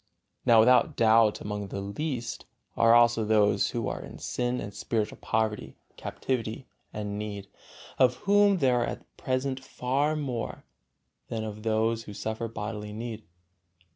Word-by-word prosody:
Now 115 -2 +7
without 125 +3 +4
doubt 110 -1 +4
among 105 -1 -4
the 100 - -5
"least" 120 +4 -4 0.3
are 115 0 +6
also 120 -1 +5
those 105 -1 +3
who 115 -3 -2
are - - -3
in - - -10
sin 125 0 -2
and 100 0 -6
spiritual 110 0 -2
poverty, 110 -11 -1 0.2
captivity 120 -1 -3 0.3
and 105 -1 -4
need, 100 -2 -5 0.5
of 130 - +5
whom 200 0 +5
there 125 -6 +3
are - - +1
at - - -8
present 130 +1 -1
far 135 +4 0
more 130 -7 -4 0.6
than 110 -1 -3
of 105 -1 -6
those 110 +1 0
who 105 - -9
suffer 110 +2 -3
bodily 105 -1 -5
need. 110 0 -6
115 Hz, 145 wpm, -28 LUFS, 105-125 Hz, 0.6 s, Now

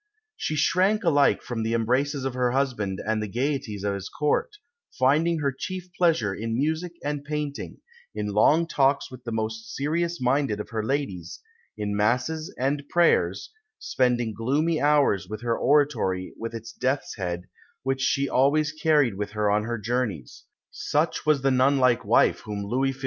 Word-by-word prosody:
She 155 - -3
shrank 185 +8 +2
alike 145 -5 +3
from 120 -2 -4
the 115 +1 0
embraces 130 +5 0
of 135 - -2
her 125 -1 0
husband 120 -9 -1
and 110 0 0
the 105 - -3
gaieties 120 -3 -2
of 100 -1 0
his 100 -1 -5
Court, 150 - 0 0.5
finding 155 +6 +3
her 140 -1 +1
chief 185 +4 -6
pleasure 160 - +2
in 115 +2 -3
music 160 +5 -1
and 145 -1 -3
painting, 150 -1 -4 0.4
in 105 0 -2
long 150 +11 +4
talks 140 -2 +1
with 125 -1 -11
the 115 - -4
most 110 0 -4
serious 170 +4 -1
minded 125 -3 +1
of 105 - -6
her 110 -1 -2
ladies, 105 - -3 0.4
in 105 -1 -2
Masses 125 +10 0
and 140 +3 0
prayers 175 -1 +2 0.3
spending 120 -3 0
gloomy 150 +9 0
hours 145 -10 +3
in 110 - -4
her 120 -1 0
oratory 125 -11 +1
with 115 +1 -6
its 115 +1 -8
death's 130 +2 -2
head, 90 -2 -3 0.4
which 135 0 -1
she 140 +1 +1
always 145 +4 +2
carried 155 -6 +2
with 105 +1 -5
her 105 -1 +1
on 105 +1 +1
her 120 +1 -2
journeys. 110 - -3 0.3
Such 155 +1 -1
was 150 -3 +3
the 135 - +3
nun 130 +2 +3
like 125 -3 +3
wife - - +3
whom 105 -1 -5
Louis 130 +5 0
XV. 130 - -16
130 Hz, 170 wpm, -25 LUFS, 110-145 Hz, 0.5 s, long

